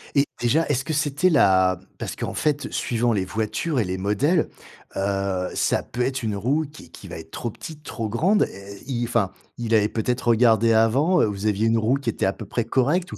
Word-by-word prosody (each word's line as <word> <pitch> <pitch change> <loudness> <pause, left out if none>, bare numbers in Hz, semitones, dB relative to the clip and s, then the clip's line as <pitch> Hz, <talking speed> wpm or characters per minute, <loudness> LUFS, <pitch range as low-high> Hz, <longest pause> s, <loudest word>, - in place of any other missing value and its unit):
Et 140 0 +4 0.2
déjà, 145 +7 +2
est-ce 135 -2 0
que 155 - -3
c'était 150 +3 +2
la 95 - +4 0.2
parce - - -5
qu'en - - -4
fait, 150 -1 -1
suivant 120 0 0
les 95 -3 0
voitures 110 - -2
et - - +3
les 95 -1 -3
modèles, 105 - +1 0.5
heu, 95 -2 -1
ça - - +1
peut 120 - -5
être 130 +1 -1
une 110 -2 -1
roue 135 +10 0
qui 150 - -13
qui - - -12
va - - -7
être 80 - -12
trop 120 - -4
petite, 150 +6 -10
trop 115 -6 -4
grande. 185 - +3
Et 100 +1 -11 0.2
et - - -5
i 120 -2 -1
enfin, 115 -5 0 0.3
il 115 -1 -2
avait 105 -1 +3
peut-être 120 +3 -2
regardé 115 -1 +4
avant? 135 +11 +3
Heu, - - +4
vous 100 0 -4
aviez 105 +1 +1
une 115 0 +3
roue 115 +4 +2
qui 140 -4 -2
était - - -1
à 95 - +1
peu 110 - -9
près 115 +3 -2
correcte 145 +10 +1
ou - - -7
115 Hz, 230 wpm, -23 LUFS, 105-140 Hz, 0.5 s, Et